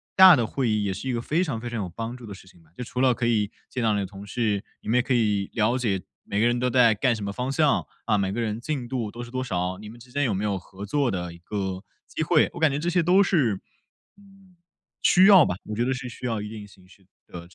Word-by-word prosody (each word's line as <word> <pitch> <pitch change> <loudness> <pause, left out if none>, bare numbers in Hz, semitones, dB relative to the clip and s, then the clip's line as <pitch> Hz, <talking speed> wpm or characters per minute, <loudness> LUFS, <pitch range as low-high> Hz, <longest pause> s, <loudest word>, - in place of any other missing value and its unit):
大 190 -3 +9
的 120 - +1
会 130 -2 -1
议 105 -1 +1
也 100 -1 -1
是 130 +8 -5
一 - - 0
个 120 - -1
非 160 +8 0
常 135 -10 -3
非 120 - -6
常 120 -2 -4
有 95 -3 -3
帮 115 +7 -6
助 125 -2 -11
的 100 - -7
事 95 -1 -14
情， 85 -2 -20 0.2
就 125 - -4
除 125 +1 -4
了 130 -1 +4
可 120 - -2
以 105 -3 +1 0.2
见 125 - -3
到 110 -1 +3
你 105 - 0
的 100 - -2
同 100 +1 -10
事， 105 -1 -1 0.2
你 - - -13
们 115 - +1
也 - - +4
可 130 +1 -1
以 105 -4 +1
了 115 +3 +1
解 100 -6 0 0.2
每 100 - -3
个 110 - +3
人 120 0 +1
都 125 - +1
在 125 -3 +5
干 120 +4 +2
什 110 - -6
么 100 - -4
方 125 +4 -3
向， 145 0 +2 0.2
啊， 110 -2 +2
每 95 -1 0
个 110 - -3
人 115 0 -2
进 135 -4 -3
度 120 -4 -3
都 120 - -8
是 120 - -11
多 130 0 -2
少， 90 -5 -2
你 105 0 -9
们 120 +2 -13
之 125 +1 -16
间 145 +2 0
有 115 - 0
没 100 - -2
有 100 -2 0
合 100 +2 -10
作 140 +3 0
的 90 -3 -4
一 85 - -14
个 95 0 -4 0.2
机 - - -5
会， 155 -1 +3
我 - - -8
感 160 - +4
觉 140 - -1
这 170 - -3
些 175 0 +2
都 185 +4 +5
是， 125 - +1 0.6
嗯， 195 -2 -21 0.5
需 185 - +5
要 195 -4 +9
吧， 90 - -2
我 105 - -5
觉 115 - 0
得 130 - 0
是 125 0 -6
需 120 - -9
要 115 -2 -1
一 105 - -6
定 105 -2 -9
形 95 -2 -20
式 95 +1 -21 0.2
的， 90 - -8
呃， 85 - -12
这 90 - -22
115 Hz, 320 characters per minute, -25 LUFS, 100-130 Hz, 0.6 s, 大